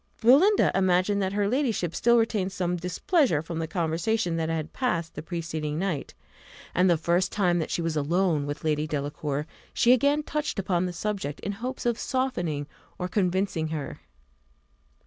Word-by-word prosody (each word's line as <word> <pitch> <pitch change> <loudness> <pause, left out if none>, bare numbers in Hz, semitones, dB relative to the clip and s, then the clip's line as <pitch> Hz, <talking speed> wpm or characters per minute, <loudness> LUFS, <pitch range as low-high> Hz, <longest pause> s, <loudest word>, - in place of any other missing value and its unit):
Belinda 300 - +5
imagined 190 +2 +2
that 190 0 -1
her 205 0 +1
ladyship 225 - 0
still 235 0 +4
retained 215 -4 +1
some 180 -1 -1
displeasure 180 - +1
from 165 0 -5
the 160 - -2
conversation 170 +3 0
that 160 -1 -1
had 160 -1 -3
passed 170 -11 -1
the 150 - -6
preceding 155 -3 -4
night, 175 -5 -3 0.6
and 180 +1 +3
the 170 - +4
first 175 +3 +1
time 180 -4 +2
that 160 - -2
she 170 - -1
was 165 -1 -1
alone 155 0 +1
with 145 +1 -5
Lady 155 -1 0
Delacour, 145 0 -3 0.3
she 240 - +5
again 285 +4 +2
touched 300 -3 -3
upon 185 -2 0
the - - -3
subject, 180 -5 -3
in 200 - -2
hopes 245 +6 -5
of 240 -1 +1
softening 175 - -1 0.3
or 180 - -2
convincing 185 -4 0
her. 155 -3 -5
180 Hz, 165 wpm, -27 LUFS, 160-210 Hz, 0.6 s, Belinda